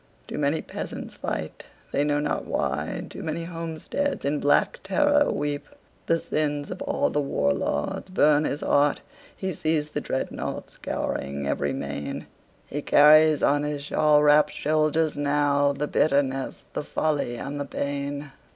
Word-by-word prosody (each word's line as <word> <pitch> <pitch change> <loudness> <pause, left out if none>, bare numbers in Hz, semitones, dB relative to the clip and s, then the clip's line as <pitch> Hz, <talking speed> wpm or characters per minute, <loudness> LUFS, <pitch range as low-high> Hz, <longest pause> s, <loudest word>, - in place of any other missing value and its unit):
Too - - -5
many 145 +2 +1
peasants - - -6
fight, - - -5 0.2
they 140 - +1
know 145 0 +1
not 150 0 -1
why; - - -2
Too - - -9
many 165 +1 -3
homesteads 165 - -3
in 145 +1 0
black 145 - +2
terror 290 +9 +3
weep. 145 0 -2 0.4
The 165 - +3
sins 145 -2 -2
of - - -6
all 285 0 0
the 150 - +1
war 70 - +1
lords 70 - -2
burn 150 -4 +4
his 145 - -2
heart. 145 0 +2 0.4
He 190 -1 -2
sees 155 -1 0
the 150 - -2
dreadnaughts 130 - -4
scouring 70 0 -3
every 70 - 0
main. 70 0 -4 0.4
He 145 - -4
carries 155 +1 +6
on 145 +1 +3
his 150 -1 -3
shawl 150 0 +3
wrapped 150 0 +5
shoulders 155 +1 +1
nowThe 145 0 +1
bitterness, 135 -3 +1
the - - -2
folly 145 -4 -1
and 140 +4 -5
the 145 - -2
pain. 140 +1 -3
145 Hz, 150 wpm, -25 LUFS, 140-155 Hz, 0.4 s, carries